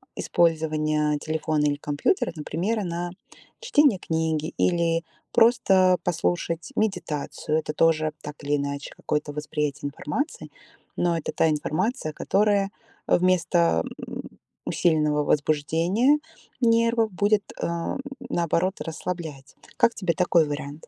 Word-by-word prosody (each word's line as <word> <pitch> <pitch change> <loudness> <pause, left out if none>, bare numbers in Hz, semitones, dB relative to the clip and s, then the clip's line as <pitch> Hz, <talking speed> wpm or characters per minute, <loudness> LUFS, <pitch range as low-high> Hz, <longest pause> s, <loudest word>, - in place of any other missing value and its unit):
использование 155 -2 +1
телефона 155 -1 -1
или 145 -1 +2
компьютера, 145 - 0
например, 180 +8 -2
на 175 0 -3 0.5
чтение 295 - +3
книги 160 -2 -1
или 170 -1 +2 0.3
просто 190 -6 +5
послушать 170 -1 -1
медитацию. 155 -6 -1
Это 150 -1 -4
тоже, 155 -1 +2
так 150 0 -9
или 145 +1 +1
иначе, 140 0 -3
какое-то 150 0 -2
восприятие 150 -1 -3
информации, 210 - -4 0.5
но 175 -1 +2
это 165 - -4
та 160 - +3
информация, 155 - -1
которая 200 +2 +1 0.3
вместо, 165 - +3 0.2
м, - - -6 0.4
усиленного 150 -3 +2
возбуждения 165 - +2 0.4
нервов 230 -1 +3
будет, 205 +2 +2 0.2
э, - - 0
м, 170 +9 -3 0.3
наоборот, 175 - 0
расслаблять. 160 -4 -6 0.2
Как 235 - +4
тебе 185 -4 0
такой 175 -2 +3
вариант? 145 +1 -6
165 Hz, 110 wpm, -25 LUFS, 150-185 Hz, 0.5 s, просто